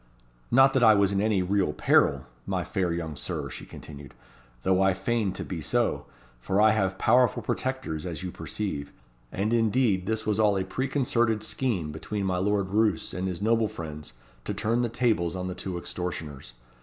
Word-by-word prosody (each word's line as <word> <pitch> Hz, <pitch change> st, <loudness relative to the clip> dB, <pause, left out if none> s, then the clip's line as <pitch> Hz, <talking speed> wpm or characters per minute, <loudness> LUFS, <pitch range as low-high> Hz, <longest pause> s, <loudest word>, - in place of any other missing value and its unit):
"Not 135 Hz, +2 st, +6 dB
that 130 Hz, -, +3 dB
I 110 Hz, -2 st, +8 dB
was 100 Hz, -1 st, +3 dB
in 100 Hz, 0 st, +1 dB
any 105 Hz, -3 st, +2 dB
real 95 Hz, -4 st, +1 dB
peril, -, -, +3 dB, 0.2 s
my -, -, -1 dB
fair 90 Hz, -3 st, -1 dB
young 80 Hz, -2 st, -3 dB
Sir," -, -, -4 dB
she -, -, -8 dB
continued, 70 Hz, -3 st, -11 dB, 0.5 s
"though 95 Hz, 0 st, +3 dB
I 95 Hz, -1 st, +3 dB
feigned 100 Hz, 0 st, -1 dB
to -, -, -5 dB
be 85 Hz, -4 st, -5 dB
so, 70 Hz, -, 0 dB, 0.3 s
for 95 Hz, +10 st, 0 dB
I 110 Hz, +1 st, +6 dB
have 95 Hz, -3 st, 0 dB
powerful 125 Hz, +4 st, +3 dB
protectors, 120 Hz, -, -2 dB
as 90 Hz, -1 st, -5 dB
you 90 Hz, -, -4 dB
perceive; 80 Hz, -11 st, -4 dB, 0.4 s
and 105 Hz, +4 st, -1 dB
indeed 115 Hz, -4 st, +2 dB
this 110 Hz, 0 st, -1 dB
was 105 Hz, 0 st, 0 dB
all 105 Hz, -2 st, +4 dB
a 95 Hz, -, 0 dB
preconcerted 120 Hz, -1 st, 0 dB
scheme 105 Hz, -, -2 dB
between 100 Hz, +6 st, -4 dB
my 90 Hz, -1 st, 0 dB
Lord 100 Hz, 0 st, 0 dB
Roos 110 Hz, +2 st, +1 dB
and 90 Hz, +1 st, -2 dB
his 95 Hz, +1 st, -4 dB
noble 115 Hz, 0 st, +3 dB
friends 75 Hz, -, -8 dB, 0.3 s
to -, -, -3 dB
turn 115 Hz, +3 st, 0 dB
the 120 Hz, -, 0 dB
tables 110 Hz, -8 st, +1 dB
on 90 Hz, 0 st, -3 dB
the 90 Hz, -, -3 dB
two 90 Hz, 0 st, -5 dB
extortioners. 80 Hz, -8 st, -5 dB
100 Hz, 185 wpm, -27 LUFS, 90-110 Hz, 0.5 s, I